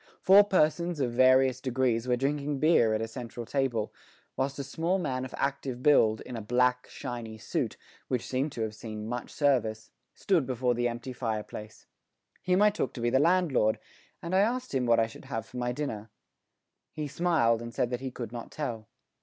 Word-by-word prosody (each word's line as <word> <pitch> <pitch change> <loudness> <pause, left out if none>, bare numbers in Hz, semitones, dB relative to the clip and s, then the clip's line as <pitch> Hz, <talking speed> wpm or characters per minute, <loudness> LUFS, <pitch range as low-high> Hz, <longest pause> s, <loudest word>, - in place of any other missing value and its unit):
Four 200 +2 +7
persons 170 -2 +1
of 125 -3 0
various 130 +1 +4
degrees 125 -2 0
were 125 - +3
drinking 140 +2 -1
beer 135 -7 +4
at 110 - -1
a - - -3
central 120 0 -7
table, 125 -5 -1 0.4
whilst 135 +1 -1
a 140 - -3
small 165 +7 -1
man 130 -8 -2
of 130 - -8
active 135 -2 -2
build, 110 -7 +4
in 125 - -7
a 115 - -4
black, 125 +3 +1
shiny 115 -3 -6
suit, - - -3 0.3
which 125 -3 -1
seemed 135 +4 -1
to 115 - -2
have 110 -1 -3
seen 110 -1 -7
much 120 +1 -4
service, 115 -7 0 0.2
stood 170 -9 +1
before 125 -1 +1
the 120 0 0
empty 120 +2 -5
fireplace. 110 -3 -5 0.6
Him 185 +2 +3
I 210 - +6
took 165 - -2
to 120 - -5
be 120 0 +1
the 130 - +4
landlord, 150 -10 +3 0.5
and 170 +2 -4
I 190 - +5
asked 245 - 0
him 130 -2 0
what 115 -1 +5
I 115 - +4
should 110 - -12
have 115 -1 -4
for 125 - -11
my 120 0 -1
dinner. 115 -6 -4 0.8
He 150 -1 -4
smiled, 140 -8 +2
and 115 0 -6
said 120 +1 -1
that 125 0 -3
he 135 - -3
could 120 -3 -7
not 120 -1 -7
tell. 115 -8 -5
125 Hz, 195 wpm, -29 LUFS, 115-145 Hz, 0.8 s, Four